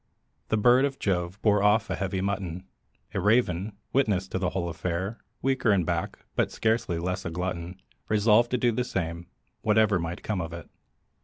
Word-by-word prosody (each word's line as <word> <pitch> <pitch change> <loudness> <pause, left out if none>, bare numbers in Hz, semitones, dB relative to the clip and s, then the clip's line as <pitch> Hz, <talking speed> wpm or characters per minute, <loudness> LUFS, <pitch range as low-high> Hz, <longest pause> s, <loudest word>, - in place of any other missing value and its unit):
The 110 - +1
bird 120 +5 +5
of 140 -1 0
Jove 90 -2 -1
bore 105 -2 +4
off 105 +2 +3
a - - 0
heavy 95 -1 -2
"mutton;" 95 -2 -3 0.5
A 100 - 0
Raven, 100 -1 +1 0.2
witness 105 -8 +2
of 95 - -1
the 90 - +1
whole 90 -1 -2
affair, 90 +5 -3 0.2
Weaker 130 -4 +2
in 95 -3 +3
back, 85 0 -2 0.2
but - - +1
scarcely 110 -6 0
less 90 +2 -2
a - - -3
glutton, 90 +1 -4 0.3
Resolved 110 +2 +4
to 125 - +1
do 120 0 +2
the 125 +2 0
same, 85 -6 -3 0.3
whate'er 105 -3 +3
Might 85 +1 -4
come 105 -4 -1
of 80 0 -5
it. 85 -1 -8
95 Hz, 180 wpm, -27 LUFS, 90-110 Hz, 0.5 s, bird